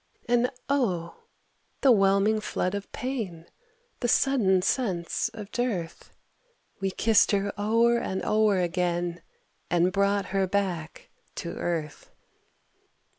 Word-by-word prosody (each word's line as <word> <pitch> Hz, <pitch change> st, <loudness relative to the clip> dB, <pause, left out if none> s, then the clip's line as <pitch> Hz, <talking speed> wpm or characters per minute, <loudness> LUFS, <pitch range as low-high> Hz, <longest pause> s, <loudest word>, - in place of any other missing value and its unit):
And 240 Hz, +1 st, +3 dB, 0.2 s
oh, 190 Hz, -12 st, -1 dB, 0.6 s
the 270 Hz, -, +6 dB
whelming 200 Hz, +1 st, +3 dB
flood 185 Hz, -3 st, -2 dB
of 200 Hz, 0 st, -5 dB
pain, 220 Hz, -11 st, -4 dB, 0.5 s
The 240 Hz, -, -1 dB
sudden 220 Hz, -8 st, +3 dB
sense 185 Hz, -10 st, -1 dB
of 210 Hz, -2 st, -9 dB
dearth! 205 Hz, -10 st, -3 dB, 0.7 s
We 195 Hz, -1 st, 0 dB
kissed 220 Hz, +3 st, +3 dB
her 200 Hz, 0 st, 0 dB
o'er 230 Hz, +3 st, +2 dB
and 190 Hz, -4 st, -3 dB
o'er 215 Hz, -2 st, +3 dB
again, 175 Hz, -1 st, -1 dB, 0.5 s
And 175 Hz, +1 st, +2 dB
brought 200 Hz, 0 st, +1 dB
her 195 Hz, -1 st, +2 dB
back 180 Hz, -5 st, -3 dB, 0.2 s
to 170 Hz, -, -5 dB
earth. 160 Hz, -4 st, -4 dB
200 Hz, 115 wpm, -27 LUFS, 175-225 Hz, 0.7 s, the